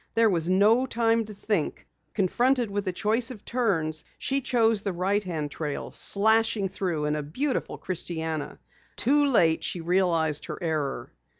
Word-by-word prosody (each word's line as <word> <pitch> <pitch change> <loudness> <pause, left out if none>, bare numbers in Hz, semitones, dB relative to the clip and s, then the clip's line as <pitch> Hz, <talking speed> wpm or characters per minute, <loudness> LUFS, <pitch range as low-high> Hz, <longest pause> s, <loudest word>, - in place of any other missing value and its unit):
There 225 -2 +4
was 170 -1 +2
no 215 +7 +4
time 230 -1 +1
to 210 - -9
think. 195 -6 -2 0.3
Confronted 240 +4 +1
with 200 0 -3
a - - +1
choice 220 +6 +1
of 225 -5 -10
turns, 165 -11 0
she 275 +1 -1
chose 225 -4 +2
the 195 -2 -3
right 195 +4 0
hand 155 -6 -4
trail, 150 -1 -5
slashing 220 -1 +2
through 175 -5 -2
in 150 0 0
a 150 - -2
beautiful 255 - -3
christiana. 160 -4 -3 0.4
Too 290 +3 +3
late, 165 -11 +3
she 180 - -2
realized 165 -3 +1
her - - -6
error. 155 -5 -3
195 Hz, 160 wpm, -26 LUFS, 160-225 Hz, 0.4 s, There